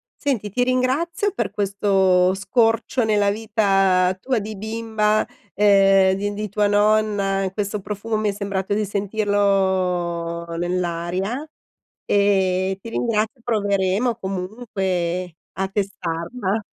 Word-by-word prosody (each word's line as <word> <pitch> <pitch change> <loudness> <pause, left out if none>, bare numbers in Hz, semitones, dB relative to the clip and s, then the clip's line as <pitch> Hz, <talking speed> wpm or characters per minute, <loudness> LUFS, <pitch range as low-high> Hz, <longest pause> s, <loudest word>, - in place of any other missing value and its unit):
Senti, 230 -9 -2
ti 245 +3 +1
ringrazio 275 +10 0
per - - -2
questo 195 -2 +2
scorcio 225 +4 +1
nella 205 -2 +2
vita 195 -4 +2
tua 255 -2 0
di 215 +1 -4
bimba, 220 0 0 0.3
ehm 195 -2 +5
di 205 +1 -2
di 210 0 -4
tua 205 +1 +1
nonna, 205 -2 +2
questo 205 +1 -3
profumo 210 +3 -4
mi 215 -1 0
è - - +1
sembrato 200 -1 -2
di 215 0 0
sentirlo 190 -5 0
nell'aria 180 - -2 0.6
e 190 -2 +2
ti 230 - -8
ringrazio 225 +1 -1
e - - -26
proveremo 205 +1 +1
comunque 185 -4 -3 0.2
a 190 - 0
testarla. 195 +2 -3
200 Hz, 115 wpm, -22 LUFS, 190-215 Hz, 0.6 s, ehm